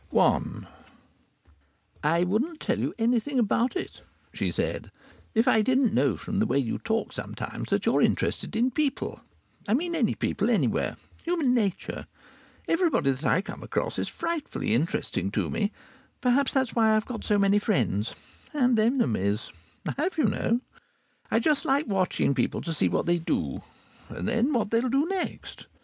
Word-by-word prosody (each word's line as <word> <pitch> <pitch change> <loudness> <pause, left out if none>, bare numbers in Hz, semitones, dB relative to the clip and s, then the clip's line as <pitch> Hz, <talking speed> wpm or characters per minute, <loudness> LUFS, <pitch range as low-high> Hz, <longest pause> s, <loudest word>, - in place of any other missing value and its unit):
I - - +4 1.6
I 165 +3 +3
wouldn't 245 - 0
tell - - -1
you - - 0
anything 240 +4 +1
about 240 - +2
it 370 - -5 0.3
(she - - -1
said) - - -2 0.5
if 225 +3 +3
I 220 -3 +5
didn't 255 +1 +2
know 135 +2 +2
from 205 -1 -3
the 220 - +2
way - - +1
you 125 -5 0
talk 225 0 -1
sometimes - - -5
that - - +1
you - - +3
are - - +4
interested - - 0
in 245 +3 +2
people. 290 +1 -1 0.5
I 210 - +3
mean 340 +5 -1
any 255 -10 +1
people, 210 +3 0
anywhere. 230 - +1 0.3
Human 330 -7 +1
nature! 205 -7 -1 0.6
Everybody 330 - +2
that 135 +4 -5
I 185 - +3
come - - -8
across - - -2
is - - -1
frightfully 335 - -2
interesting 120 - 0
to - - 0
me. 210 -1 0 0.5
Perhaps 260 +2 +2
that's 265 -4 +1
why 220 -2 +4
I've 215 - +1
got 245 -3 -6
so 210 - +2
many 200 +1 +4
friends 120 - 0 0.4
and 250 -5 +3
enemies. 120 - +1 0.4
I - - -1
have, 360 +2 -1
you 305 - +3
know. 230 +3 +1 0.7
I - - +2
just 300 -3 +2
like 280 +3 +2
watching 190 -8 +1
people 125 -3 0
to 165 - -3
see 95 - +1
what 85 - 0
they 175 0 +2
do, 75 - -2 0.5
and - - -5
then 235 +5 +2
what 230 -6 0
they'll 235 +2 +2
do 275 +4 +2
next. 380 -1 -4
225 Hz, 170 wpm, -27 LUFS, 190-270 Hz, 1.6 s, I